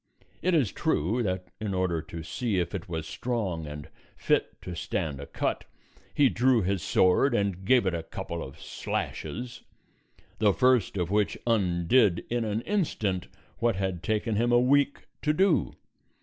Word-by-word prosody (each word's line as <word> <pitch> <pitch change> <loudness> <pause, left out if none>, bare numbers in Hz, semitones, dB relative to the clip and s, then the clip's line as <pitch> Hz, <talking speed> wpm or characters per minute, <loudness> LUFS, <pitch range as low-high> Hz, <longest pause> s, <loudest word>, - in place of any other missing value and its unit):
It 185 -1 +2
is 135 -11 +2
true 95 +11 0
that 90 -4 -2
in 105 -3 -2
order 90 -3 0
to 80 +1 -8
see 110 +4 -2
if 85 -1 -1
it 95 -3 -5
was 80 -2 -3
strong 95 -11 -3
and 75 0 -7 0.3
fit - - 0
to 90 - -6
stand 85 -4 -3
a 70 - -7
cut - - -2 0.5
he 145 - +4
drew 125 -2 +3
his 95 0 0
sword 95 - +3
and 100 -3 -1
gave 125 0 +4
it 95 - +1
a 85 - -2
couple 85 +1 -6
of 65 - -9
slashes, 120 -1 -4 0.8
the 105 -2 +4
first 125 -5 +3
of 90 0 -1
which 105 0 +1
undid 100 -1 +3
in 120 -1 +1
an 110 +1 -1
instant 110 - -1 0.3
what 115 -3 +2
had 95 -3 -2
taken 110 +2 0
him 120 +2 +2
a 120 - +6
week 140 +3 +2 0.2
to 150 - +2
do. 190 +1 +2
100 Hz, 165 wpm, -28 LUFS, 90-120 Hz, 0.8 s, a